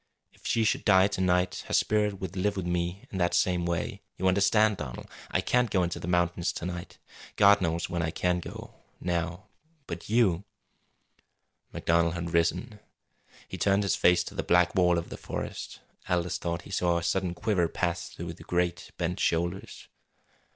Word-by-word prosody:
If - - -10
she 115 - +2
should 105 - +1
die 95 -2 +6
to 100 - -3
night 90 0 +1
her - - 0
spirit 105 -2 +2
would 95 0 -5
live 100 +2 0
with 95 - -2
me 90 +2 -2
in 95 - -4
that 85 -1 +2
same 90 -2 +2
way. 85 -1 -2 0.2
You 95 - 0
understand, 105 +2 +3
Donald. 65 -5 -7 0.2
I - - +1
can't 125 -1 +2
go 95 -2 +2
into 85 0 -2
the - - -6
mountains 90 0 +1
to - - -5
night. 90 -1 -6 0.4
God 100 0 +6
knows 85 -1 0
when 85 -1 -2
I 80 - 0
can 90 +2 0
go - - -9 0.3
now. 90 +1 -2 0.4
But 85 +2 -7
you 105 -6 +3 0.6
" - - -44
MacDonald 85 0 +1
had 85 0 -4
risen. 105 +7 0 0.7
He - - -7
turned 100 0 +3
his 100 - +1
face 90 0 +4
to - - -8
the - - -2
black 90 0 +3
wall 90 -2 +3
of 85 - -4
the - - -7
forest. - - -6 0.3
Aldous 90 0 0
thought 85 0 -3
he - - -12
saw 85 -1 +1
a 85 - -3
sudden 90 -1 0
quiver 95 -4 +1
pass 85 +1 -2
through 85 0 -7
the - - -13
great, 90 0 -1
bent 90 0 -2
shoulders. 85 +3 -1
90 Hz, 185 wpm, -28 LUFS, 85-95 Hz, 0.7 s, die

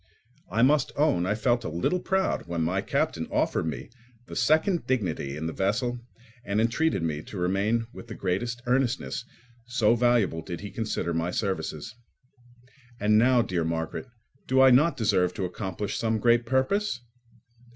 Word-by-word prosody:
I 115 +6 +2
must 145 +1 +3
own 140 - +2
I 105 - +1
felt 120 +2 +1
a - - -3
little 85 - 0
proud 190 - 0
when 85 -1 -1
my 90 +4 0
captain - - -1
offered - - 0
me 80 +7 -5 0.3
the - - -9
second 160 +3 +2
dignity 85 - -1
in 80 - -4
the 80 - -3
vessel 120 - -1 0.4
and 105 -2 -1
entreated 115 - +1
me 75 -2 -2
to 100 - -9
remain 100 +6 +1
with 120 - -10
the 110 - -7
greatest 120 +6 -2
earnestness, 125 - 0 0.4
so 115 -3 +3
valuable 120 -8 +2
did 85 +1 -7
he 100 -1 -7
consider 100 -5 -2
my 85 +1 -1
services. 90 -2 -3 1.1
And 105 +1 +4
now, 125 0 +4
dear 90 -6 -1
Margaret, 80 +8 -3 0.4
do 130 +1 +3
I 130 0 +8
not 150 +7 +4
deserve 95 -5 +1
to 95 - -2
accomplish 95 +2 -4
some 110 -1 +1
great 120 +1 +3
purpose? 130 - 0
110 Hz, 160 wpm, -27 LUFS, 90-125 Hz, 1.1 s, I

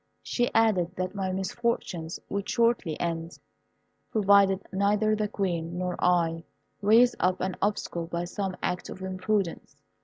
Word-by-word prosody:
She 245 -1 0
added 190 -6 +3
that 185 +1 -3
my 190 -2 -2
misfortunes 185 -4 -2
would 200 0 -3
shortly 230 -9 +1
end, 165 0 -3 0.7
provided 200 -2 +4
neither 205 +2 +2
the 215 0 -1
Queen 175 -4 -2
nor 180 -1 -2
I 165 -2 +2 0.4
raised 230 +4 +5
up 185 +1 +1
an 185 0 -2
obstacle 185 -4 -1
by 170 +1 -3
some 190 +1 -4
act 180 0 -2
of 190 - -8
imprudence. 190 0 -2
190 Hz, 140 wpm, -27 LUFS, 175-210 Hz, 0.7 s, raised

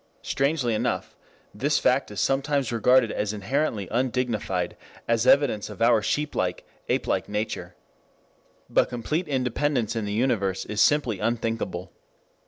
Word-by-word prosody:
Strangely 135 -4 0
enough, 105 - -2 0.4
this - - +1
fact - - +2
is - - -6
sometimes 135 -2 +1
regarded 120 +1 +4
as 105 0 -2
inherently 105 0 -1
undignified, 115 -7 -1 0.3
as 115 +1 +1
evidence 130 -7 +4
of - - -10
our 115 -1 +4
sheep 150 +7 -1
like, 90 -1 -2 0.2
ape - - +1
like - - -1
nature. 105 +1 -3 0.9
But - - +2
complete 150 +9 -2
independence 130 -3 0
in 110 -2 -2
the 105 - -3
universe 100 -5 0
is 105 0 -1
simply 125 -9 +3
unthinkable. 110 -5 -2
115 Hz, 135 wpm, -25 LUFS, 105-135 Hz, 0.9 s, regarded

